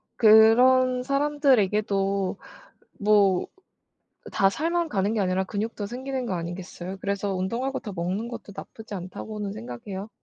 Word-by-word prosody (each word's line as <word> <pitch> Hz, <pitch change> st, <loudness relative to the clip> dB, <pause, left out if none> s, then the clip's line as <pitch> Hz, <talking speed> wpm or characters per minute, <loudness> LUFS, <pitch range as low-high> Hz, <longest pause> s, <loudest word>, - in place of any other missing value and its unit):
그런 250 Hz, +3 st, +6 dB
사람들에게도 210 Hz, -9 st, +1 dB, 0.6 s
뭐 200 Hz, -3 st, +3 dB, 0.8 s
다 195 Hz, 0 st, +3 dB
살만 335 Hz, -, -1 dB
가는 200 Hz, +2 st, 0 dB
게 215 Hz, -, 0 dB
아니라 185 Hz, 0 st, +1 dB
근육도 205 Hz, +1 st, -4 dB
생기는 260 Hz, +2 st, -4 dB
거 190 Hz, -, -2 dB
아니겠어요? 175 Hz, +2 st, -6 dB
그래서 200 Hz, 0 st, -2 dB
'운동하고 235 Hz, +9 st, -2 dB
더 210 Hz, -6 st, -7 dB
먹는 185 Hz, +6 st, -3 dB
것도 230 Hz, -4 st, -8 dB
나쁘지 220 Hz, -1 st, -10 dB
않다.'고는 200 Hz, +3 st, -6 dB
생각해요. 190 Hz, -, -7 dB
210 Hz, 310 characters per minute, -25 LUFS, 190-250 Hz, 0.8 s, 그런